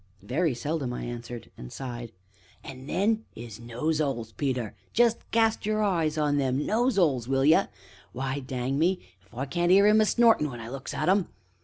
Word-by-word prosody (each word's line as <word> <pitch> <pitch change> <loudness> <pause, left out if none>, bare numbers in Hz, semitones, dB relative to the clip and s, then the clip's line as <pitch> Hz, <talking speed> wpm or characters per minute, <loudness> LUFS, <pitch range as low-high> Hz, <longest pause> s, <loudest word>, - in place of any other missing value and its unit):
"Very 140 - 0
seldom!" 140 -1 -2
I - - -5
answered, 120 -1 -7
and - - -9
sighed. 120 -3 -6 0.5
"An' 130 0 -9
then 215 +6 +1
'is 115 -2 -9
nose 125 +7 -2
'oles, 120 -6 -2
Peter, 125 -4 -2 0.2
jest 235 -1 +3
cast 225 -1 +2
your 215 +1 0
eye 170 -6 +2
on 145 -1 +1
them 135 0 0
nose'oles, 190 - +2
will 135 0 +1
ye; 155 +2 +6 0.5
why, 135 +2 -3
dang 130 +1 -3
me! 180 +3 +2 0.2
if 95 - -29
I 130 +3 -4
can't 175 +5 0
'ear 200 +2 +7
'im 215 +1 +6
a - - +4
snortin' 225 -11 +4
when 120 -3 -8
I 115 0 -7
looks 135 +1 -6
at - - -1
'em! 190 0 +3
140 Hz, 185 wpm, -27 LUFS, 125-185 Hz, 0.5 s, ear